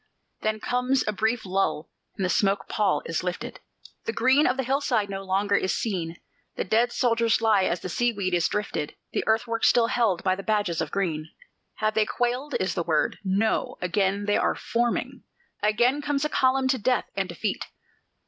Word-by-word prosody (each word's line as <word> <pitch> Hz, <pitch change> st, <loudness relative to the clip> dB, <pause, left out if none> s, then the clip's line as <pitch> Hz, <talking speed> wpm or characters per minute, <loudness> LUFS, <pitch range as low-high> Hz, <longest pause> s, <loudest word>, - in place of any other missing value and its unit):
Then 215 Hz, 0 st, -1 dB
comes 250 Hz, +3 st, +1 dB
a -, -, +2 dB
brief 220 Hz, +3 st, 0 dB
lull, 185 Hz, -5 st, -1 dB, 0.2 s
and 190 Hz, -, -1 dB
the -, -, 0 dB
smoke 200 Hz, -1 st, +1 dB
pall 195 Hz, -9 st, +1 dB
is 165 Hz, +1 st, -2 dB
lifted, 180 Hz, -1 st, -4 dB, 0.5 s
The 455 Hz, -, -1 dB
green 270 Hz, +4 st, +4 dB
of 250 Hz, -, +1 dB
the 265 Hz, -, 0 dB
hillside 245 Hz, -6 st, 0 dB
no 195 Hz, 0 st, -4 dB
longer 195 Hz, +1 st, +1 dB
is 185 Hz, -, +1 dB
seen; 175 Hz, -6 st, -3 dB, 0.4 s
The -, -, -1 dB
dead 230 Hz, +5 st, +2 dB
soldiers 230 Hz, -2 st, +2 dB
lie 215 Hz, -4 st, +3 dB
as 175 Hz, -, -1 dB
the -, -, -4 dB
sea 240 Hz, +7 st, +1 dB
weed 195 Hz, -4 st, -2 dB
is 175 Hz, -2 st, +3 dB
drifted, 210 Hz, -8 st, -3 dB, 0.2 s
The -, -, 0 dB
earthworks 230 Hz, +1 st, +2 dB
still 240 Hz, -1 st, +4 dB
held 230 Hz, -6 st, +1 dB
by 185 Hz, -, +2 dB
the 195 Hz, -, -6 dB
badges 205 Hz, -6 st, 0 dB
of 160 Hz, -, -2 dB
green. 160 Hz, -5 st, -2 dB, 0.5 s
Have 215 Hz, 0 st, 0 dB
they 215 Hz, -1 st, +2 dB
quailed? 250 Hz, +4 st, -1 dB
is 185 Hz, -2 st, 0 dB
the 175 Hz, -, -1 dB
word. 160 Hz, -2 st, 0 dB
No: 200 Hz, +3 st, 0 dB
again 195 Hz, +2 st, 0 dB
they 205 Hz, -, +2 dB
are -, -, +1 dB
forming 235 Hz, +1 st, -1 dB, 0.4 s
Again 240 Hz, +7 st, +2 dB
comes 290 Hz, 0 st, -1 dB
a -, -, 0 dB
column 260 Hz, -1 st, +2 dB
to 260 Hz, -1 st, +2 dB
death 250 Hz, +4 st, +1 dB
and -, -, -1 dB
defeat! -, -, -3 dB
215 Hz, 190 wpm, -26 LUFS, 190-240 Hz, 0.5 s, green